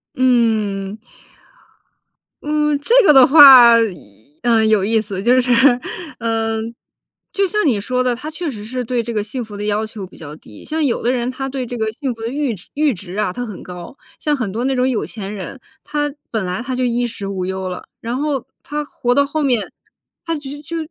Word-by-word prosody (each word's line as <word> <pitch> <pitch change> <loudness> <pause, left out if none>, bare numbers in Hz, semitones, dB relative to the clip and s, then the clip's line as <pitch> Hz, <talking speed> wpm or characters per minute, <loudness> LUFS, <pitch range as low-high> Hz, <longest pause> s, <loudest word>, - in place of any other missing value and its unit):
嗯。 220 -5 +1 1.5
嗯， 300 -1 +1
这 455 - 0
个 - - +8
的 265 -2 +8
话， 270 -5 +10 0.7
呃， 230 -2 +3
有 215 -3 +3
意 220 +2 +3
思。 200 -2 -5
就 250 +2 +4
是， 250 -1 +2 0.7
呃， 225 -1 -1 0.7
就 395 -1 +1
像 425 +1 0
你 240 -9 +2
说 250 +5 -1
的， 250 -1 +1
他 275 +6 -6
确 325 0 -4
实 210 -4 -8
是 250 +3 -4
对 245 0 -1
这 235 +1 -5
个 210 -2 -1
幸 245 +4 -4
福 210 -1 -11
的 205 - -5
要 210 +1 0
求 215 -3 -7
比 185 - -16
较 150 -2 -9
低。 105 -9 -15
像 315 0 -2
有 260 -5 0
的 245 - +1
人 245 0 -1
他 270 +1 -5
对 265 -1 -4
这 245 +1 -6
个 220 -1 -1
幸 265 +1 -3
福 225 - -14
的 225 - -3
阈 275 0 -1 0.2
阈 295 -2 +2
值 185 -1 -9
啊， 210 -3 0
他 245 +6 -5
很 210 -5 -9
高。 180 +6 -9 0.2
像 300 -1 0
很 230 -7 -3
多 230 +5 -3
那 270 0 0
种 255 0 +2
有 245 - -1
钱 205 -2 -6
人， 210 +6 -8 0.2
他 295 -1 -2 0.2
本 220 -3 -1
来 180 +5 -3
他 255 +1 -4
就 255 - -1
衣 245 0 0
食 205 -4 -7
无 190 -2 -3
忧 190 0 -4
了， 180 - -6 0.2
然 235 +2 -3
后 285 -2 -2 0.2
他 295 +1 -4
活 245 -4 -1
到 280 +1 +4
后 305 +2 -3
面， 250 -7 +1 0.5
他 330 -1 -1
就 290 0 -8
就 330 +3 -6
245 Hz, 225 characters per minute, -18 LUFS, 215-275 Hz, 1.5 s, 话